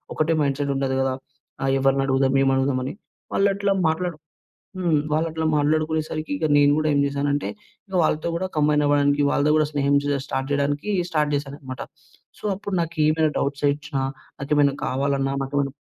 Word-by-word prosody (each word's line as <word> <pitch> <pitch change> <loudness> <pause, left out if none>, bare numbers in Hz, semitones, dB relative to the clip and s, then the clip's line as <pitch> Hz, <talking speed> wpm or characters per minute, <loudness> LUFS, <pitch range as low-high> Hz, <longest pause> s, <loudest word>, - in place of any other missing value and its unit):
ఒకటే 160 +1 +1
మైండ్‌సెట్ 140 0 0
ఉండదు 135 -1 -1
కదా! 135 -1 0 0.5
ఆహ్, 135 0 +1
ఎవరిని 135 0 +2
అడుగుదాం, 135 0 +2
ఏం 135 - +3
అడుగుదాం 135 -1 +1
అని. - - -4 0.4
వాళ్ళట్లా 200 0 +2 0.2
మాట్లాడ 175 +2 -1 0.7
హ్మ్. 170 -5 +2
వాళ్ళట్లా 160 0 0
మాట్లాడుకునే 155 +2 +1
సరికి 155 0 -5
ఇక 155 - -3
నేను 145 0 +5
కూడా 155 0 +1
ఏం 140 - +3
చేశానంటే, 145 +1 -1 0.5
వాళ్ళతో 155 +1 0
కూడా 185 +2 -2
కంబైన్ 150 0 +3
అవ్వడానికి 145 0 +3
వాళ్ళతో 145 +1 +2
కూడా 155 - +3
స్నేహం 140 0 +2 0.3
స్టార్ట్ 135 -1 -3
చేయడానికి 145 +6 -1 0.2
స్టార్ట్ 150 -2 +1
చేశాను 140 0 -5
అన్నమాట. 130 -2 -8 0.6
సో, - - -17
అప్పుడు 200 0 -5
నాకీమైనా 155 -1 +1
డౌట్స్ 140 +1 -2
వచ్చినా, 145 -1 -3 0.4
నాకేమైనా 140 0 +2
కావాలన్నా, 135 +1 0
నాకేమన్నా 135 0 -1
145 Hz, 155 wpm, -23 LUFS, 140-155 Hz, 0.7 s, నేను